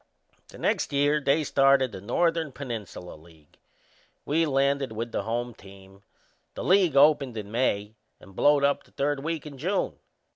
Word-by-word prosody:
The - - -14
next - - -1
year 145 +1 +2
they 145 +3 +2
started 135 -2 +3
the 95 -3 -9
Northern 165 - 0
Peninsula 115 -9 -7
League. 80 -1 -19 0.7
We 160 +3 +1
landed 140 -1 +1
with 115 +2 -5
the - - -2
home 120 +3 -3
team. 95 -1 -16 0.5
The - - -5
league 185 -5 +3
opened 140 -4 +4
in 105 -1 -7
May 110 -3 -1 0.3
and 95 - -16
blowed 145 +4 +3
up 140 0 +2
the - - -24
third 140 0 -2
week 165 -1 -3
in 140 -3 -10
June. 190 +7 -2
135 Hz, 160 wpm, -26 LUFS, 105-145 Hz, 0.7 s, opened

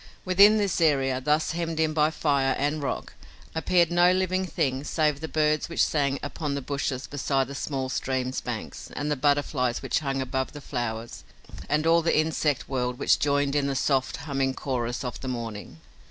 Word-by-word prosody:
Within 200 +4 +6
this 200 -5 0
area, 135 -4 +2
thus 150 +4 +1
hemmed 165 -1 -3
in 160 -1 +2
by 155 0 +3
fire 140 -4 +1
and 145 +2 -1
rock, 140 - -4 0.4
appeared 170 +1 +2
no 175 +1 +5
living 185 0 0
thing 135 -4 -1
save 150 -2 0
the 160 - -5
birds 155 0 +1
which 170 - +2
sang 140 -2 +1
upon 145 0 -3
the 140 - -3
bushes 135 -1 -2
beside 135 -1 -1
the 140 - -7
small 135 -2 -3
stream's 130 0 -2
banks 120 -3 -6
and 150 +1 -2
the - - +2
butterflies 140 -3 +1
which - - +1
hung 135 -3 -2
above 130 +1 -2
the 145 - -7
flowers 120 -4 -5 0.5
and 150 +1 +1
all 165 +1 +5
the 165 -1 +2
insect 155 -2 0
world 125 -2 -2
which - - +3
joined 145 -1 +1
in 145 -1 +2
the 140 - -1
soft, 135 -1 +1
humming 135 -3 -1
chorus 125 -3 -3
of 125 - -5
the 130 - -6
morning. 115 -8 -5
145 Hz, 185 wpm, -26 LUFS, 130-155 Hz, 0.5 s, Within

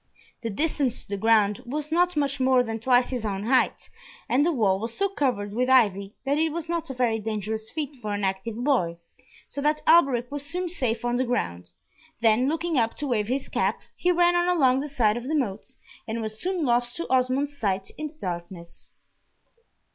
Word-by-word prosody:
The 230 - -3
distance 280 +2 -1
to - - -20
the 200 - -2
ground 215 +1 +3
was 295 +4 -4
not 350 0 +2
much 280 -1 0
more 260 -1 +4
than 225 -1 -4
twice 245 +2 +3
his 250 -3 -3
own 200 -2 -2
height, 255 +4 +1 0.4
and 265 +4 +3
the 340 - +2
wall 205 - +2
was 225 +2 -4
so 395 0 +1
covered 245 - -1
with 250 +3 0
ivy, 205 -6 +3
that 285 +2 +1
it 320 0 +2
was 335 +1 -4
not 335 -2 -2
a 265 - -5
very 235 -3 +1
dangerous 220 0 -3
feat 300 -1 -4
for 210 -2 -4
an 205 - -4
active 195 +3 -2
boy, 180 -12 +1 0.5
so 285 - -5
that 300 +1 +1
Alberic 275 -7 +4
was 290 -1 -4
soon 355 +5 -3
safe 240 -8 -1
on 240 0 +1
the 255 - +2
ground, 90 - -2 0.5
then 230 +3 +3
looking 325 -2 0
up 230 -1 0
to 295 - -4
wave 220 -6 0
his 260 +3 -2
cap, - - 0 0.2
he 360 - +1
ran 350 0 +3
on 350 0 +2
along 270 -8 +3
the 295 +2 -4
side 235 -5 +2
of 240 +1 -6
the 310 - 0
moat, 220 -8 -3 0.3
and 225 +1 -3
was 215 -1 -5
soon 365 -3 -1
lost 240 -1 +1
to 335 - -4
Osmond's 260 +3 +1
sight 195 -7 -2
in 305 - -4
the 305 - -15
darkness. 175 - -7
250 Hz, 210 wpm, -25 LUFS, 220-295 Hz, 0.5 s, more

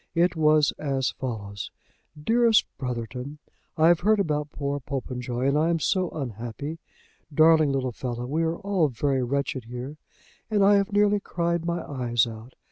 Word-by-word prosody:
It 175 +1 +3
was 155 -2 +4
as 135 -3 0
follows: 100 -6 -5 0.5
"DEAREST 230 +6 +4
BROTHERTON, 125 +2 -5 0.4
I 160 +1 +5
have 170 -1 +4
heard 215 +3 +3
about 150 -5 0
poor 140 0 -3
Popenjoy, 125 -2 -3
and 140 - +2
I 155 +2 +2
am 170 - +2
so 185 +2 +1
unhappy. 130 +4 -5 0.5
Darling 155 0 +5
little 130 -2 -1
fellow. 120 0 -4
We 150 +6 -1
are 165 0 0
all 195 -5 +1
very 135 +1 0
wretched 130 -1 -2
here, 125 +5 -7 0.5
and 210 -2 +3
I 205 0 +6
have 200 +2 0
nearly 205 0 +3
cried 170 -3 -2
my 170 0 -2
eyes 120 -4 +1
out. 115 +2 -10
145 Hz, 160 wpm, -26 LUFS, 125-170 Hz, 0.5 s, I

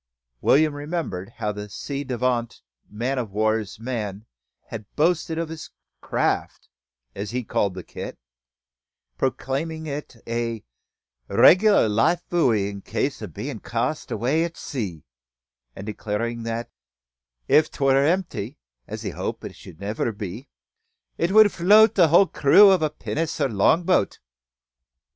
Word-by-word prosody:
William 155 +1 +4
remembered 145 - -4
how 105 - -1
the 105 0 -7
ci 140 +7 -5
devant 125 -2 -2 0.3
man 125 +5 -2
o' - - 0
war's 110 0 -1
man 110 -4 -4 0.4
had 110 -2 -7
boasted 160 +1 +1
of 165 -1 -2
his 160 -1 -8 0.3
craft, - - -2 0.4
as 100 +1 -5
he 125 +1 -3
called 100 -3 -1
the 90 - -7
kit, - - -8 1.0
proclaiming 160 +4 -2
it 145 -3 -6
"a 115 -1 -3 0.6
reg'lar 200 - +6
life 115 +12 +1
buoy 120 - +2
in 100 -1 -7
case - - -2
o' - - -5
bein' - - -6
cast - - -3
away 130 +9 +1
at 170 -1 -5
sea," 100 - -5 0.7
and 95 - -8
declaring 110 +2 -3
that, 115 +1 -4 0.8
"if 155 - +4
't - - -14
war 135 -1 +5
emp'y, 145 - 0 0.3
as - - -6
he - - -3
hoped - - -5
it 80 - -11
never 105 +3 -3
should 110 -3 -4
be, 105 +7 -7 0.7
it 170 +2 +1
would 215 0 +7
float 210 +5 +6
the 175 -4 +5
whole 170 +5 +6
crew 195 +5 +6
o' 185 -4 +3
a 155 - +2
pinnace 155 +1 -4
or - - +1
longboat." 160 - +2
130 Hz, 140 wpm, -24 LUFS, 105-160 Hz, 1.0 s, would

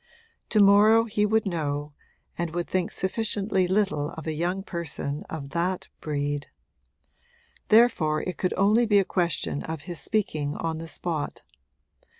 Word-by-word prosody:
To 215 - +2
morrow 210 +3 +6
he 210 -2 0
would 220 +1 +2
know, 150 -5 -2 0.4
and 170 -1 -3
would 175 0 -2
think 185 -2 0
sufficiently 195 -1 0
little 190 -6 +1
of 160 - -8
a 160 - -2
young 175 +5 -2
person 160 -5 -4
of 140 -3 -6
that 175 +3 -2
breed: 145 -1 -2 1.2
therefore 195 -10 +4
it 180 - -4
could 185 - -1
only 215 +5 +4
be 205 -1 +4
a 195 - +4
question 170 -6 -1
of 160 -2 -6
his 175 +1 -6
speaking 155 -9 -1
on 160 -1 -3
the 165 - -7
spot. 160 - -4
175 Hz, 150 wpm, -26 LUFS, 155-205 Hz, 1.2 s, morrow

